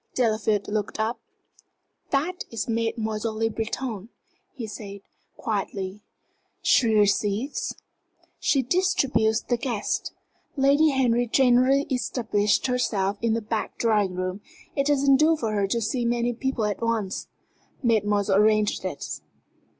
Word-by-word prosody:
Delafield 215 Hz, -4 st, +1 dB
looked 210 Hz, 0 st, -3 dB
up. 225 Hz, +2 st, -1 dB, 0.9 s
"That 330 Hz, +7 st, -1 dB
is 225 Hz, -3 st, -4 dB
Mademoiselle 225 Hz, -1 st, -2 dB
Le 225 Hz, 0 st, +1 dB
Breton," 225 Hz, -1 st, -4 dB, 0.4 s
he 250 Hz, -6 st, -6 dB
said, 200 Hz, -2 st, -8 dB, 0.4 s
quietly. 200 Hz, -2 st, -3 dB, 0.6 s
"She 240 Hz, -, +4 dB
receives?" 210 Hz, +5 st, +1 dB, 0.6 s
"She 270 Hz, -2 st, +2 dB
distributes 255 Hz, -9 st, +2 dB
the 240 Hz, -, -1 dB
guests. 230 Hz, -3 st, -2 dB, 0.5 s
Lady 280 Hz, +3 st, +4 dB
Henry 245 Hz, -3 st, +2 dB
generally 260 Hz, +3 st, +4 dB
establishes 220 Hz, -5 st, 0 dB
herself 210 Hz, -6 st, 0 dB
in 230 Hz, -1 st, +1 dB
the 230 Hz, -, -2 dB
back 220 Hz, 0 st, -3 dB
drawing 210 Hz, -5 st, +1 dB
room. 185 Hz, +2 st, -3 dB, 0.3 s
It 275 Hz, 0 st, +1 dB
doesn't 280 Hz, -2 st, +4 dB
do 315 Hz, +3 st, +4 dB
for 225 Hz, -6 st, -2 dB
her 200 Hz, -2 st, +1 dB
to 235 Hz, +4 st, 0 dB
see 240 Hz, +3 st, -1 dB
too 235 Hz, -, +1 dB
many 240 Hz, 0 st, 0 dB
people 245 Hz, -1 st, -1 dB
at 205 Hz, 0 st, -2 dB
once. 225 Hz, -4 st, -1 dB, 0.6 s
Mademoiselle 205 Hz, -4 st, +2 dB
arranges 215 Hz, -1 st, +3 dB
it." 185 Hz, -6 st, -4 dB
225 Hz, 125 wpm, -25 LUFS, 210-255 Hz, 0.9 s, She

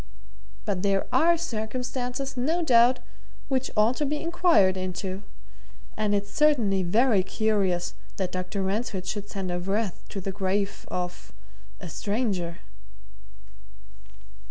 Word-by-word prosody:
"But 180 Hz, -, -1 dB
there 195 Hz, -1 st, +2 dB
are 340 Hz, +1 st, +5 dB
circumstances, 250 Hz, 0 st, -3 dB
no 315 Hz, +8 st, +1 dB
doubt, 245 Hz, -3 st, +6 dB, 0.5 s
which 265 Hz, -1 st, 0 dB
ought 220 Hz, +4 st, +4 dB
to 300 Hz, -, 0 dB
be 300 Hz, +1 st, -1 dB
inquired 330 Hz, -, +4 dB
into. 185 Hz, +1 st, -3 dB, 0.7 s
And 210 Hz, -1 st, +1 dB
it's 205 Hz, 0 st, -2 dB
certainly 240 Hz, -11 st, +3 dB
very 215 Hz, +4 st, +3 dB
curious 190 Hz, -3 st, 0 dB, 0.2 s
that 185 Hz, -2 st, -1 dB
Dr. 185 Hz, +2 st, -3 dB
Ransford 195 Hz, -1 st, -2 dB
should 205 Hz, +2 st, -4 dB
send 190 Hz, -2 st, -3 dB
a 175 Hz, -, -1 dB
wreath 195 Hz, +1 st, -1 dB
to 195 Hz, -, -4 dB
the 195 Hz, +1 st, -3 dB
grave 195 Hz, +1 st, -1 dB
of 180 Hz, 0 st, -4 dB, 0.5 s
a -, -, -7 dB
stranger." 195 Hz, -, -2 dB
205 Hz, 125 wpm, -27 LUFS, 190-250 Hz, 0.7 s, doubt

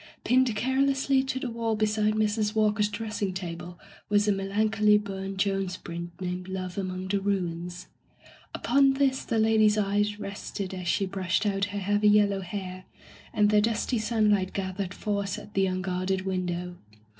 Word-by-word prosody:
Pinned 255 Hz, -2 st, +3 dB
carelessly 270 Hz, +3 st, +2 dB
to 260 Hz, 0 st, -2 dB
the 255 Hz, -2 st, -4 dB
wall 230 Hz, -1 st, -1 dB
beside 215 Hz, 0 st, +1 dB
Mrs. 215 Hz, 0 st, 0 dB
Walker's 210 Hz, -1 st, +3 dB
dressing 215 Hz, -4 st, -3 dB
table 175 Hz, -1 st, -6 dB, 0.3 s
was 205 Hz, 0 st, +3 dB
a -, -, +5 dB
melancholy 210 Hz, +2 st, +2 dB
Burne 195 Hz, -1 st, -5 dB
Jones 195 Hz, -2 st, 0 dB
print 170 Hz, +1 st, -7 dB
named 180 Hz, 0 st, -4 dB
"Love 185 Hz, -1 st, -4 dB
among 185 Hz, -1 st, -3 dB
the 200 Hz, +1 st, 0 dB
Ruins.'* 180 Hz, -3 st, -2 dB, 0.7 s
Upon 275 Hz, +2 st, +3 dB
this 270 Hz, -1 st, +1 dB
the 230 Hz, -, -1 dB
lady's 220 Hz, -1 st, +4 dB
eyes 205 Hz, 0 st, +1 dB
rested 200 Hz, -1 st, -5 dB
as 180 Hz, -1 st, -5 dB
she 195 Hz, -, +2 dB
brushed 190 Hz, +1 st, -1 dB
out 200 Hz, -1 st, +1 dB
her 205 Hz, 0 st, -6 dB
heavy 205 Hz, +2 st, +2 dB
yellow 205 Hz, -2 st, +4 dB
hair, 185 Hz, -1 st, -6 dB, 0.5 s
and 210 Hz, 0 st, +3 dB
the 210 Hz, 0 st, +5 dB
dusty 225 Hz, +2 st, 0 dB
sunlight 210 Hz, -4 st, +1 dB
gathered 190 Hz, -1 st, -3 dB
force 200 Hz, -2 st, -2 dB
at 205 Hz, -, -11 dB
the 195 Hz, 0 st, +2 dB
un 185 Hz, 0 st, -2 dB
guarded 185 Hz, 0 st, -1 dB
window. 180 Hz, -2 st, -3 dB
200 Hz, 160 wpm, -27 LUFS, 185-215 Hz, 0.7 s, a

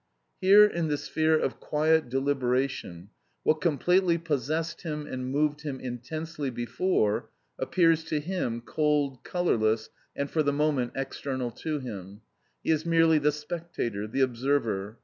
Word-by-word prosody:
Here 200 Hz, +3 st, +8 dB
in 170 Hz, -5 st, -1 dB
the 150 Hz, -1 st, 0 dB
sphere 155 Hz, +2 st, +1 dB
of -, -, -2 dB
quiet 155 Hz, -1 st, +2 dB
deliberation, 130 Hz, -8 st, -1 dB, 0.3 s
what 155 Hz, 0 st, +2 dB
completely 170 Hz, +3 st, +3 dB
possessed 160 Hz, +1 st, -2 dB
him 150 Hz, -3 st, -4 dB
and 130 Hz, -1 st, -4 dB
moved 150 Hz, +2 st, 0 dB
him 145 Hz, -3 st, -5 dB
intensely 145 Hz, +5 st, -5 dB
before, 120 Hz, -, 0 dB, 0.3 s
appears 165 Hz, -3 st, +3 dB
to 155 Hz, -2 st, -1 dB
him 145 Hz, -8 st, -2 dB
cold, 145 Hz, -1 st, 0 dB
colourless, 110 Hz, -11 st, 0 dB, 0.2 s
and 140 Hz, -, -1 dB
for 155 Hz, -, 0 dB
the 145 Hz, -1 st, +1 dB
moment 145 Hz, -4 st, +1 dB
external 135 Hz, -2 st, -3 dB
to 155 Hz, +5 st, -3 dB
him; 105 Hz, -6 st, -8 dB, 0.4 s
he -, -, +1 dB
is 155 Hz, -1 st, +1 dB
merely 165 Hz, -2 st, +4 dB
the 150 Hz, +1 st, +3 dB
spectator, 150 Hz, -9 st, -4 dB
the 135 Hz, +5 st, -1 dB
observer. 120 Hz, -5 st, 0 dB
145 Hz, 140 wpm, -28 LUFS, 125-160 Hz, 0.4 s, Here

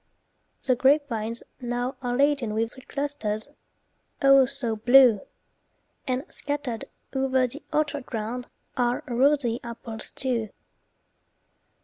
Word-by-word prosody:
The 255 Hz, -, +3 dB
grapevines 240 Hz, -4 st, +1 dB, 0.2 s
now 245 Hz, +1 st, -2 dB
are 245 Hz, -1 st, -1 dB
laden 275 Hz, -6 st, +2 dB
with 225 Hz, +1 st, 0 dB
Sweet 260 Hz, -, -14 dB
clusters, 275 Hz, -7 st, -3 dB, 0.8 s
oh, 275 Hz, -1 st, +7 dB
so 260 Hz, -4 st, -3 dB
blue! 245 Hz, -1 st, +6 dB, 0.9 s
And 255 Hz, +1 st, 0 dB
scattered 285 Hz, -6 st, -3 dB, 0.3 s
o'er 265 Hz, -1 st, +2 dB
the 270 Hz, +5 st, -5 dB
orchard 295 Hz, -3 st, -1 dB
ground 235 Hz, +2 st, -4 dB, 0.3 s
Are 245 Hz, 0 st, 0 dB
rosy 250 Hz, -1 st, +2 dB
apples, 230 Hz, -1 st, -5 dB
too. 240 Hz, -5 st, -2 dB
250 Hz, 105 wpm, -26 LUFS, 230-275 Hz, 0.9 s, oh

